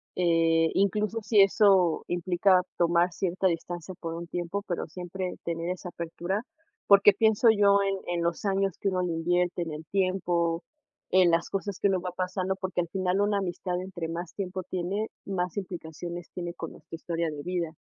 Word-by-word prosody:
eh, 165 -2 +3
incluso 210 +3 +1
si 210 -1 +4
eso 195 -4 +4
implica 180 +1 +3 0.2
tomar 170 +1 +3
cierta 190 +1 0
distancia 175 +1 -3
por 165 -1 -4
un 170 0 -6
tiempo, 175 +4 -3
pero 175 - -2
siempre 180 +2 -5
tener 170 0 -2
esa 180 0 -4
apertura, 175 +5 -3 0.4
porque 200 0 +7
pienso 220 +1 +3
yo 200 -2 +5
en 195 0 0 0.2
en 170 - -1
los 170 +3 -1
años 195 -2 +1
que 200 - +1
uno 185 -1 0
le 180 -2 -1
invierte, 175 +2 0
en 165 - -6
el 155 +1 -7
tiempo, 180 -3 0 0.5
en 185 -2 +5
las 165 0 +1
cosas 195 0 -3
que 200 - +3
uno 190 -2 +1
va 180 0 -4
pasando, 185 +1 -2
porque 190 -1 -2
al 170 - -5
final 185 +1 0
una 205 0 +2
amistad, 180 -1 -3
entre 175 -3 -5
más 170 0 -5
tiempo 185 -1 -4
tiene, 185 +4 -2 0.2
más 180 -3 -2
implicaciones 175 -2 -6
tiene 175 -1 -5
con 165 - -6
nuestra 160 +1 -18
historia 165 0 -2
de 145 - -6
vida. 175 -3 -2
180 Hz, 180 wpm, -28 LUFS, 170-195 Hz, 0.5 s, porque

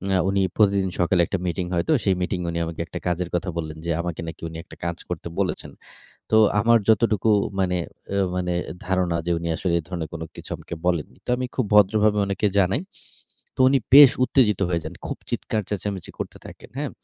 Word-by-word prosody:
আ - - +4
উনি 100 0 +1 0.2
প্রতিদিন 100 -3 +3
সকালে 90 0 +3
একটা 95 - -2
মিটিং 90 +1 -2
হয়তো। 85 - +1
সেই 95 -2 +2
মিটিং 90 0 -1
উনি 85 0 -2
আমাকে 80 0 -7
একটা - - -6
কাজের 90 0 -1
কথা 90 +1 -1
বললেন 80 -1 -4
যে, 85 - 0
আমাকে 85 -2 -4
নাকি 80 +1 -8
উনি 80 - -8
একটা - - -14
কাজ 85 0 -2
করতে 85 -2 -4
বলেছেন। 95 -2 -2 0.6
তো - - +4 0.3
আমার 115 +2 +5
যতটুকু 110 -1 +3 0.3
মানে 90 -1 +1 0.4
এ - - +1 0.2
মানে 90 -1 -1 0.3
ধারণা 90 -2 +1
যে, 85 - +2
উনি 85 - -4
আসলে 85 +1 -1
এ - - -4
ধরনের 85 -4 -4 0.3
কিছু - - -10
আমাকে - - -8
বলেননি 85 -4 -1
তো - - -9
আমি 130 - -2
খুব 130 - +1
ভদ্রভাবে 105 +1 +4
উনাকে 100 +1 0
জানাই। 95 - +2 0.8
তো - - -7
উনি 135 +1 +4 0.2
বেশ 145 -2 +11
উত্তেজিত 110 -8 +2
হয়ে 85 -2 0
যান। - - -6
খুব - - -5
চিৎকার 110 - -2
চেঁচামেচি 100 -3 -4
করতে - - -5
থাকেন, - - -13
হ্যাঁ। 145 -1 -2
95 Hz, 195 wpm, -23 LUFS, 85-105 Hz, 0.8 s, বেশ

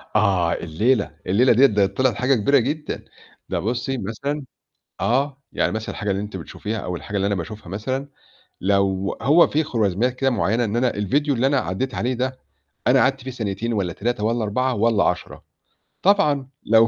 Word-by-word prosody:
آه 95 -5 +3
الليلة، 100 +8 0 0.2
الليلة 115 +7 +4
ديّة 130 +5 +6
ده 105 -6 +3
طِلعِت 120 +4 +1
حاجة 125 +4 +2
كبيرة 140 +6 +3
جدًا. 150 +5 -3 0.5
ده - - -1
بُصي 120 +4 -2
مثلًا 140 +7 -3 0.6
آه، 135 +3 0
يعني - - 0
مثلًا 110 +1 -4
الحاجة 100 -1 -2
اللي 95 +1 -1
أنتِ 105 -2 -6
بتشوفيها 105 +6 -5
أو 90 -3 -4
الحاجة 100 +4 -7
اللي 100 - +1
أنا 100 - 0
باشوفها 95 +1 -7
مثلًا، 130 +8 -3 0.5
لو 100 0 +1
هو 155 +5 +6
في 155 +2 +1
خوارزميات 115 -2 0
كده 135 +1 +1
معينة 120 -1 +1
إن 105 0 -2
أنا 120 +1 +2
الفيديو 140 +9 +1
اللي 130 +3 +2
أنا 140 - +2
عدّيت 130 +5 -3
عليه 125 +3 0
ده 130 +1 -2 0.5
أنا 130 +2 +5
قعدت 135 0 +2
فيه 130 +1 -6
ثانيتين 115 0 -3
والّا 95 -5 -1
3 115 0 -2
والّا 115 +1 +1
4 125 +5 0
والّا 110 -1 +3
10. 90 - -2 0.6
طبعًا 150 -9 +3
لو 115 +1 +5
115 Hz, 180 wpm, -22 LUFS, 100-130 Hz, 0.6 s, ديّة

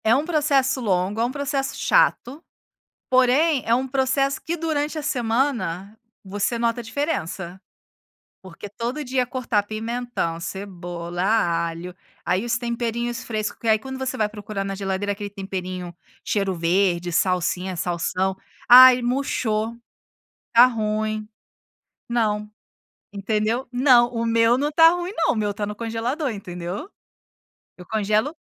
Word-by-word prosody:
É 220 +1 +5
um 285 +3 0
processo 280 -5 +1
longo, 195 0 0
é - - +3
um 245 - -2
processo 280 -1 -2
chato, 315 - +1 0.7
porém, 260 +3 +3
é 230 - +2
um 255 +2 +1
processo 270 +1 +1
que, 335 - -1
durante 310 -2 -2
a - - -4
semana, 225 - -1 0.3
você 205 +4 -2
nota 235 0 0
a - - -12
diferença. 195 - -3 0.8
Porque 190 +2 -10
todo 240 +8 -4
dia 255 0 0
cortar 245 -5 -1
pimentão, 220 -5 -3
cebola, 175 -2 -6 0.5
alho 170 +2 -7 0.3
aí 185 +3 +1
os 235 -1 0
temperinhos 235 0 -3
fresco 215 -2 -3
que 230 - -5
aí, 220 0 +5
quando 265 +4 -7
você 260 -1 -3
vai 215 - +1
procurar 210 -1 -5
na 195 0 -4
geladeira 195 +1 -2
aquele 205 0 -6
temperinho, 185 -3 -6 0.3
cheiro-verde, 180 -2 0
salsinha, 180 +1 0
salsão 185 +3 -1 0.3
"Ai, 255 +1 +9
murchou. 240 -3 -1 0.8
Tá 240 +2 +8
ruim." 215 -2 -2 0.8
Não. 210 -3 0 0.6
Entendeu, 215 +5 -1
não, 245 -1 +5
o 230 -1 -3
meu 230 +1 +3
não 290 +3 0
tá 325 +2 +7
ruim, 355 +2 -3
não. 330 - +2
O - - -6
meu 210 -1 0
tá 205 0 -4
no 210 - -5
congelador, 235 +6 -2
entendeu. 185 - -6 0.9
Eu 180 - -13
congelo 215 - 0
225 Hz, 135 wpm, -23 LUFS, 195-255 Hz, 0.9 s, Ai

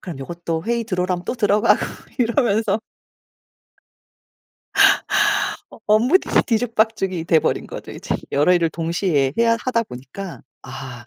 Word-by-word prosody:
그럼 170 -7 -8
요것도 165 +3 -4
회의 235 0 0
들어오라면 180 -3 -2
또 - - -3
들어가고 210 -2 +3 0.4
이러면서. 225 -3 +1 2.9
업 - - -16
업무들이 240 - +3
뒤죽박죽이 220 -6 0
돼 165 -2 +4
버린 - - -1
거죠, - - -8
이제 - - -3 0.2
여러 150 +6 +3
일을 170 -2 +2
동시에 165 -4 0
해야 230 0 +3
하다 235 -3 0
보니까. 165 - -9 0.2
아 130 -3 -9
190 Hz, 285 characters per minute, -21 LUFS, 165-225 Hz, 2.9 s, 돼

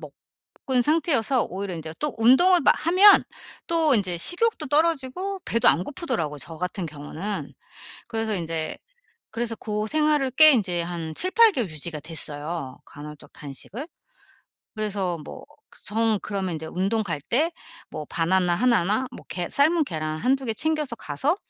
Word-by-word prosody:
먹은 255 -3 -4
상태여서 280 -5 +2
오히려 190 0 -5
인제 160 0 -7
또 300 -2 -3
운동을 335 +11 +5
마 - - +5
하면 375 +5 +6 0.4
또 325 -4 +3
인제 185 -5 +1
식욕도 350 - 0
떨어지고 330 +5 0
배도 230 - +2
안 180 - +2
고프더라고 165 - -3
저 160 +5 -7
같은 180 +1 -4
경우는. 155 +7 -6 0.6
그래서 225 -2 -2
인제 165 -3 -3 0.6
그래서 230 0 -2
고생활을 265 +7 0
꽤 310 +3 +8
이제 180 -7 0
한 170 -2 -5
7-8 435 +5 +4
개월 235 -7 -2
유지가 155 0 -6
됐어요 150 -2 -4
간헐적 150 +1 -11
단식을. 175 - -9 0.9
그래서 200 -5 -2
뭐 - - -10 0.4
정 220 0 +1
그러면 195 -3 -3
인제 160 0 -6
운동 195 +7 -1
갈 170 -8 -4
때 300 - +1 0.4
뭐 155 -2 -6
바나나 175 +1 +1
1 235 -6 +3
나 215 +7 0
뭐 - - -11
계 175 -1 -4
삶은 315 +3 +3
계란 155 - -4
1-2 265 +2 +1
개 225 - -1
챙겨서 305 -2 -1
가서 245 - -1
215 Hz, 285 characters per minute, -24 LUFS, -, 0.9 s, 꽤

